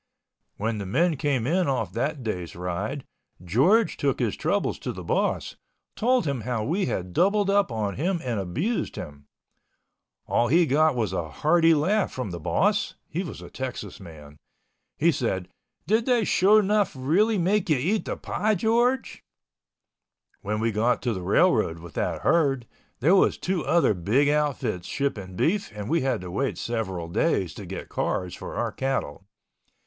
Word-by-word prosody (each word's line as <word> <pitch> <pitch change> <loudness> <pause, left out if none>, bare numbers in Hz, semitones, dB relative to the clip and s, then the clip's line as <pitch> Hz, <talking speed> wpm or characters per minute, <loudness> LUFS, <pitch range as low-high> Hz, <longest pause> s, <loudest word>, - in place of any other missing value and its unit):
When 110 +1 -2
the 100 - -5
men 165 - +2
came 135 -4 0
in 175 +5 +1
off 115 -9 -1
that 140 +4 -2
day's 90 -7 -4
ride, 90 +9 -4 0.4
George 140 - +3
took - - 0
his - - 0
troubles - - -1
to - - -4
the - - -8
boss, - - -1 0.4
told 245 -2 +2
him 140 -5 -1
how 115 -1 -2
we 180 - 0
had 90 -6 -3
doubled 200 - +3
up 200 -8 +2
on 105 -4 -2
him 175 +5 0
and 120 -5 -2
abused 145 - -2
him. 70 -2 -9 1.0
All 120 - +1
he 165 +7 +4
got 155 0 +3
was 110 -6 -1
a 85 -4 -3
hearty 165 - +3
laugh 190 +7 +1
from 125 -7 -4
the 85 - -5
boss 205 - +1
(he 170 - -2
was 175 - -7
a - - -11
Texas 130 -2 -6
man). 75 -5 -12 0.6
He 170 +3 +4
said, 95 - -2 0.4
"Did 220 +4 +1
they 245 -3 +3
sho 205 +4 +5
'nuff 205 -4 +1
really 190 +12 +2
make 190 +2 +1
you 155 - +4
eat 190 - 0
the - - -3
pie, 215 0 0
George?" 235 +5 +1 1.2
When 105 +2 -2
we 115 +1 +1
got 115 +4 +1
to 120 -2 0
the 95 - -5
railroad 85 -1 +2
with 85 -1 -11
that - - -2
herd, 135 -7 +2 0.4
there 165 +9 +5
was 190 - +3
two 180 -3 -1
other 170 -10 +3
big 110 +11 +2
outfits 140 -11 -1
shipping 105 -10 -3
beef 195 - 0
and 105 -1 -5
we 165 +7 +1
had 130 -5 0
to 90 -1 -7
wait 135 +8 -1
several 95 -8 -3
days 85 - 0
to - - -9
get - - -6
cars 90 -1 -2
for - - -7
our - - -1
cattle. 115 - -3
135 Hz, 175 wpm, -25 LUFS, -, 1.2 s, sho